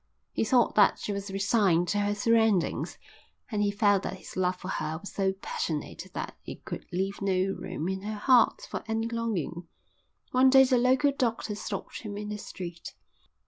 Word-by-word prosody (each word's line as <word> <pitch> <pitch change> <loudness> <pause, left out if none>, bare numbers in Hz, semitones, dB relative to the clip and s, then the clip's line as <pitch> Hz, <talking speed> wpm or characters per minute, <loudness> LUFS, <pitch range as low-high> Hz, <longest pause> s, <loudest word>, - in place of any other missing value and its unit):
He - - 0
thought 240 +2 +3
that 205 -2 +5
she 205 - -4
was 200 0 -4
resigned 195 -3 +2
to 205 - +1
her 205 0 +1
surroundings, 220 -3 +2 0.5
and 210 -2 0
he 205 - +2
felt 205 -1 +3
that 190 - -5
his - - -12
love 185 0 +1
for 180 - -9
her 160 -3 -2
was 200 +5 -9
so 195 -1 +1
passionate 165 -5 -4
that - - -4
it - - -9
could - - -6
leave 190 +3 -2
no 195 0 +1
room 180 -3 -4
in 190 0 -2
her 210 +1 -4
heart 245 +2 +4
for - - -5
any 225 0 -1
longing. 215 -8 -3 0.6
One 255 +1 +5
day 265 0 +8
the 255 -1 +3
local 260 +3 +4
doctor 230 -5 -1
stopped 205 -1 -5
him 205 -3 -6
in 210 0 -5
the 210 0 -4
street. 175 -4 -8
205 Hz, 185 wpm, -28 LUFS, 190-225 Hz, 0.6 s, day